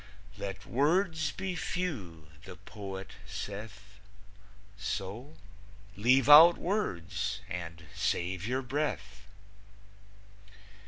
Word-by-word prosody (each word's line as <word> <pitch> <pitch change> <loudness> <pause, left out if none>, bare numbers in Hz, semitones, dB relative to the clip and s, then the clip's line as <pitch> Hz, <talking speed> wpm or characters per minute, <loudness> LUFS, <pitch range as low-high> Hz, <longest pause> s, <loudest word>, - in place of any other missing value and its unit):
"Let 100 -1 -6
words 155 - +1
be 190 -1 -4
few," 125 - -4 0.2
the - - -9
poet 95 -2 -8 0.2
saith, 100 0 -8 0.8
So 105 - -5 0.6
leave 125 +5 +4
out 160 +4 +10
words 100 - -2
and 85 -1 -6
save 90 +2 -1
your 130 +2 -1
breath. 105 -8 -3
105 Hz, 85 wpm, -31 LUFS, 95-150 Hz, 0.8 s, out